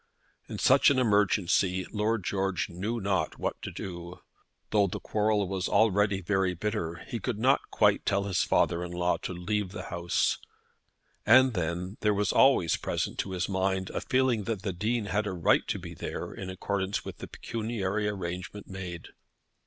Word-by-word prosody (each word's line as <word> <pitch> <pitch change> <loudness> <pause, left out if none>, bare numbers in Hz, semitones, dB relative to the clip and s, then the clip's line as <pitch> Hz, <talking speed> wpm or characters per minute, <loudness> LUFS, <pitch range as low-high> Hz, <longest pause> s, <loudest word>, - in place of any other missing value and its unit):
In - - -5
such - - +5
an 140 - +2
emergency 100 -5 +2
Lord 110 0 0
George 95 -1 -1
knew 100 +7 -3
not 100 -2 -1
what - - -3
to - - -5
do. 85 -1 -7 0.5
Though 105 -2 +4
the - - -4
quarrel 105 -2 +1
was 95 0 -2
already 105 -2 +3
very 95 -1 +1
bitter, 90 -3 -3
he 115 - -4
could 115 +1 -3
not 130 +5 +2
quite 105 -2 +3
tell 100 0 +1
his 95 -3 0
father 85 +1 +2
in 90 - -6
law 90 0 +1
to - - -5
leave 95 +2 -2
the - - -7
house; 85 0 +1 0.8
and 130 -1 +6
then 90 +2 -3
there 105 -1 +2
was 100 0 +1
always 130 -11 +4
present - - -3
to 95 - -2
his 90 -1 -1
mind 95 -1 -1
a - - -3
feeling 125 -5 +1
that 110 -4 -3
the 100 -3 -2
Dean 110 +5 -1
had 105 +1 -1
a 100 - -2
right 85 -3 +2
to - - -1
be - - -8
there - - -5
in 95 - -6
accordance 95 +1 -2
with - - -8
the - - -7
pecuniary 105 -3 -3
arrangement 95 0 -5
made. 90 -3 -7
100 Hz, 175 wpm, -29 LUFS, 90-105 Hz, 0.8 s, and